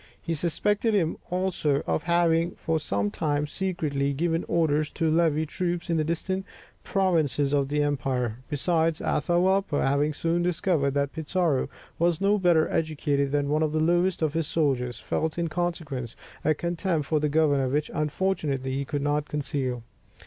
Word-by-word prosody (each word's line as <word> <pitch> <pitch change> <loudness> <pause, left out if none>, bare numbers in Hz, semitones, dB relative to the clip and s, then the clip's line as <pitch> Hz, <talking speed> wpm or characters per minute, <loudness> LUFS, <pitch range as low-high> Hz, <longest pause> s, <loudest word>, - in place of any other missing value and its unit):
He 165 - -3
suspected 205 +7 0
him 165 -5 +1
also 180 -6 0
of - - 0
having 170 0 +2
for 160 -1 -1
some 100 -8 -1
time 145 +2 0
secretly 150 -5 -1
given 165 +3 0
orders 155 -2 +1
to 160 -1 +1
levy 160 -1 +2
troops 175 +2 -2
in 165 - +2
the 155 - +2
distant 185 +4 -2 0.4
provinces 155 - +1
of 140 -1 +2
the 150 0 +1
empire. 130 -5 -1
Besides, 160 +2 +1
Atahualpa 175 +1 +1
having 145 +2 +1
soon 170 +2 0
discovered 165 -5 +1
that 140 0 0
Pizarro 160 -2 0 0.3
was 170 -1 +2
no 200 +1 +3
better 175 -4 +4
educated 145 -3 0
than 145 -1 +1
one 155 +1 +1
of 155 -1 +1
the 155 - +1
lowest 175 +2 +2
of 155 -2 +1
his 165 -2 -1
soldiers, 125 -7 0
felt 160 +8 -2
in 170 -1 -1
consequence 155 -8 -3 0.3
a 155 +1 +3
contempt 170 -1 -1
for 155 +1 +1
the 150 0 0
governor 145 -3 +2
which, 145 +3 -1
unfortunately, 150 -4 -1
he 140 +1 -2
could 145 0 -3
not 145 0 0
conceal. 135 -5 -2
155 Hz, 165 wpm, -26 LUFS, 145-170 Hz, 0.4 s, better